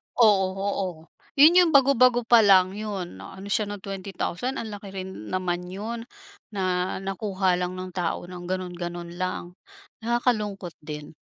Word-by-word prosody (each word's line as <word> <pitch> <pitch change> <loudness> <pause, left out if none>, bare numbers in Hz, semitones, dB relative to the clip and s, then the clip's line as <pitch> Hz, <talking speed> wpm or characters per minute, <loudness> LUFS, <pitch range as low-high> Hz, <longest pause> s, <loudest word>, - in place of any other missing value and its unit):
Oo, 205 -5 +5
oo, 195 0 -1 0.5
yun 310 +5 +8
yung 350 -2 +5
bago-bago 255 -3 +5
pa 235 0 +6
lang 190 -3 +6
yun, 200 - -5
ano 190 - -9
siya 210 +1 +2
ng 205 -1 -7
20,000 195 +5 -3
ang 225 -4 -5
laki 205 -1 -8
rin 190 0 -4 0.2
naman 180 -1 -2
yun. 210 +6 -5 0.5
Na 185 -3 -1
nakuha 195 -2 0
lang 180 0 -2
ng 185 0 -6
tao 175 -2 -2
ng 175 0 -9
ganon-ganon 175 -2 -4
lang 185 -1 -3 0.5
nakakalungkot 220 -5 -1
din. 150 -1 -8
195 Hz, 145 wpm, -25 LUFS, 180-215 Hz, 0.5 s, yun